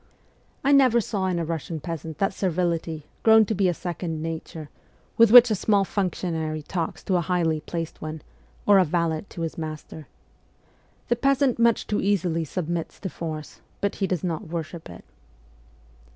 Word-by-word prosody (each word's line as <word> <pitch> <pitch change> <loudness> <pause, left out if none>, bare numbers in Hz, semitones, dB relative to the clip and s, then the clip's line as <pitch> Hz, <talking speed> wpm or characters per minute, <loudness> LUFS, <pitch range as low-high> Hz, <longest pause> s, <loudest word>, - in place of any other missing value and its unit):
I 280 - +3
never 260 -4 +5
saw 200 -4 -2
in 180 -2 0
a 170 - -1
"Russian 160 0 -4
peasant 160 -1 -6
that 195 0 0
servility, 170 -4 -1 0.2
grown 220 -1 +6
to 220 - -1
be 190 -2 +2
a - - +1
second 170 -2 -4
nature, 160 -1 -6 0.4
with 230 -1 +6
which 245 +1 +9
a - - +4
small 200 0 +2
functionary 165 -6 -2
talks 165 +1 -4
to 185 - +1
a - - +1
highly 170 -2 0
placed 165 0 -5
one, 155 0 -6 0.4
or 200 -1 +6
a - - +6
valet 165 0 -1
to 170 - -8
his 165 0 -4
master. 155 -1 -7 1.0
The 240 - +3
peasant 275 0 +2
much 235 -1 +3
too 210 - -1
easily 175 -5 0
submits 170 +1 -4
to 190 - -3
force, 155 -3 -7 0.2
but 200 - -1
he 195 - 0
does 185 -2 -2
not 165 -4 -3
worship 165 - -6
it. 85 - -12
175 Hz, 170 wpm, -25 LUFS, 160-200 Hz, 1.0 s, which